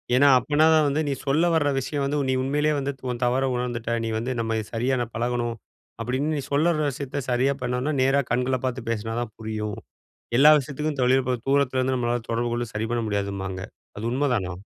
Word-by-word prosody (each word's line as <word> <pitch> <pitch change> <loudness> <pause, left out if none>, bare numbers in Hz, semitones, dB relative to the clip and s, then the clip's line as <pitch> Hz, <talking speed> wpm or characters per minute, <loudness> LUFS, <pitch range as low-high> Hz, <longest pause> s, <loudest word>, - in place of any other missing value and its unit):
ஏன்னா, 140 +2 +6
அப்பன்னாதான் 155 +3 +4
வந்து 145 +2 +1
நீ 140 - +1
சொல்ல 150 +5 +3
வர 145 -3 +2
விஷயம் 140 +2 -2
வந்து 145 +2 -1
நீ 130 - +2
உண்மையிலே 150 +3 +1
வந்து 140 +1 -2
த - - -30
உன் 120 0 -5
தவற 130 +2 +1
உணர்ந்துட்ட, 120 -1 -2
நீ - - -2
வந்து 125 +3 -2
"நம்ம 115 -1 0
சரியா 125 +3 +1
நான் 120 -1 -5
பழகணும்", 120 0 -1 0.5
அப்பிடின்னு 140 +5 -1
நீ 140 - -3
சொல்ல 150 +4 +3
வர்ற 155 -2 0
விஷயத்த 140 +1 -4
சரியா 135 +3 +2
பண்ணோன்னா, 125 +4 -1
நேரா 135 +2 +3
கண்கள 125 +1 +1
பார்த்து 125 -2 -3
பேசினா 115 0 -3
தான் 110 -3 -6
புரியும். 110 -1 -4 0.6
எல்லா 150 +3 +8
விஷயத்துக்கும் 145 +1 -4
தொழில் 130 +1 +4
இப்ப 125 0 0
தூரத்திலேருந்து 130 -2 +2
நம்மளால 120 -1 0
தொடர்புகொண்டு 120 0 -1
சரி 110 +1 -2
பண்ண 120 -1 0
முடியாதும்பாங்க. 100 -2 -3 0.4
அது 110 - -4
உண்மைதானா? 125 -9 0
125 Hz, 190 wpm, -25 LUFS, 115-140 Hz, 0.6 s, எல்லா